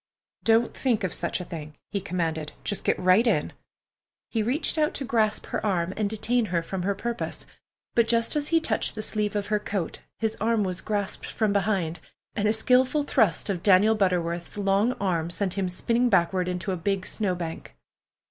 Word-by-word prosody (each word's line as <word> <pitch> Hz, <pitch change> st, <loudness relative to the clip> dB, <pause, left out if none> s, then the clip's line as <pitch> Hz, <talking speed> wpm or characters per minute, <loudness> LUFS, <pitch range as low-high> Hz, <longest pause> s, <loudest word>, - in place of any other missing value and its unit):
"Don't 230 Hz, +1 st, +3 dB
think 235 Hz, -5 st, 0 dB
of 185 Hz, -, -1 dB
such 170 Hz, -, -2 dB
a 180 Hz, -, -5 dB
thing," 155 Hz, -3 st, -8 dB, 0.2 s
he 200 Hz, -, -1 dB
commanded. 165 Hz, -4 st, -2 dB
"Just 205 Hz, -, -2 dB
get -, -, +2 dB
right 185 Hz, +6 st, +4 dB
in." -, -, +1 dB, 0.8 s
He 225 Hz, -, +1 dB
reached 265 Hz, +8 st, 0 dB
out 305 Hz, 0 st, +1 dB
to 275 Hz, -, -2 dB
grasp 220 Hz, -2 st, +1 dB
her -, -, -3 dB
arm 185 Hz, -3 st, 0 dB
and 210 Hz, -2 st, 0 dB
detain 225 Hz, +2 st, +1 dB
her 170 Hz, -4 st, -1 dB
from 190 Hz, +2 st, -4 dB
her 200 Hz, +2 st, 0 dB
purpose, 235 Hz, +3 st, -4 dB, 0.5 s
but 235 Hz, -1 st, +3 dB
just 230 Hz, +3 st, +2 dB
as 295 Hz, -1 st, 0 dB
he 330 Hz, -, +4 dB
touched 235 Hz, -9 st, -1 dB
the 215 Hz, -, -2 dB
sleeve 210 Hz, -1 st, -1 dB
of 205 Hz, -1 st, 0 dB
her 210 Hz, -, +3 dB
coat 200 Hz, -5 st, -3 dB, 0.2 s
his 220 Hz, -1 st, -1 dB
arm 225 Hz, -1 st, +2 dB
was 185 Hz, -2 st, -2 dB
grasped 205 Hz, -2 st, -2 dB
from 215 Hz, -3 st, 0 dB
behind, 190 Hz, -5 st, 0 dB, 0.3 s
and 210 Hz, -2 st, 0 dB
a 215 Hz, -, +3 dB
skilful 255 Hz, +6 st, +3 dB
thrust 220 Hz, -, +2 dB
of 190 Hz, -4 st, -2 dB
Daniel 200 Hz, +3 st, +5 dB
Butterworth's 175 Hz, -4 st, -1 dB
long 200 Hz, +4 st, +2 dB
arm 175 Hz, -7 st, -1 dB
sent 185 Hz, +1 st, -2 dB
him 195 Hz, -2 st, -1 dB
spinning 235 Hz, +7 st, +1 dB
backward 180 Hz, -1 st, +2 dB
into 180 Hz, +1 st, -2 dB
a 185 Hz, -, -1 dB
big 195 Hz, +2 st, -1 dB
snowbank. 175 Hz, -, -3 dB
200 Hz, 190 wpm, -26 LUFS, 180-225 Hz, 0.8 s, Daniel